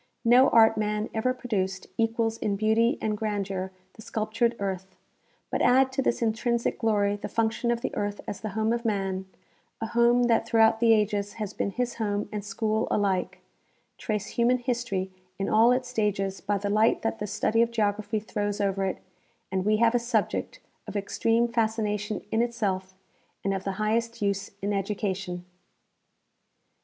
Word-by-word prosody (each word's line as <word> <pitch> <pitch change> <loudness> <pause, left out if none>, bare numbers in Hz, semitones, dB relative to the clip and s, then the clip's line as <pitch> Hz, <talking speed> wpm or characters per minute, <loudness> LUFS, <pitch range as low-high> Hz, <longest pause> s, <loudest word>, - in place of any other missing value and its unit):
No 250 +3 +6
art 225 -1 +6
man 210 0 -1
ever 225 +3 +1
produced 195 -7 -2
equals 225 0 0
in 200 - 0
beauty 220 +3 +2
and 215 -1 -1
grandeur 200 -3 -3 0.2
the - - -13
sculptured 225 +2 -1
earth; 190 -2 -4 0.6
but - - 0
add 260 +1 +4
to 265 +1 0
this 235 - 0
intrinsic 235 +1 0
glory 205 -3 +1
the - - -6
function 230 +1 0
of 235 0 0
the - - -3
earth 205 0 -2
as 205 - -5
the 215 - -3
home 220 +1 +2
of 235 0 -2
man, 195 -4 -1 0.5
a 225 - -2
home 235 +2 +3
that 230 -1 +2
throughout 225 -1 +4
the 230 -1 +5
ages 205 -1 0
has 210 -3 -5
been - - -1
his 245 +3 -3
home 205 -1 -1
and 210 -1 -4
school 215 +1 -1
alike; 195 -3 0 0.6
trace 210 -2 -2
human 240 +2 +2
history 235 -7 -2 0.3
in 195 - -2
all 225 +3 +5
its 250 0 0
stages 200 -4 -1
by 200 +1 0
the 205 +1 -3
light 215 +2 +3
that 225 0 -1
the 210 - -3
study 210 +3 +1
of 235 - +3
geography 215 -1 0
throws 205 -1 -3
over 195 -1 0
it, 190 - -2 0.5
and 190 0 -1
we 215 0 +3
have 230 +1 +4
a 245 - +3
subject 235 +2 -1 0.3
of - - -7
extreme 225 +3 +1
fascination 220 -3 -1
in 225 - +2
itself 195 -6 -2 0.5
and 195 - 0
of 190 -1 -3
the 195 - -1
highest 230 +3 -1
use 200 -1 -1
in 205 +1 0
education. 195 -3 -3
215 Hz, 170 wpm, -27 LUFS, 200-230 Hz, 0.6 s, No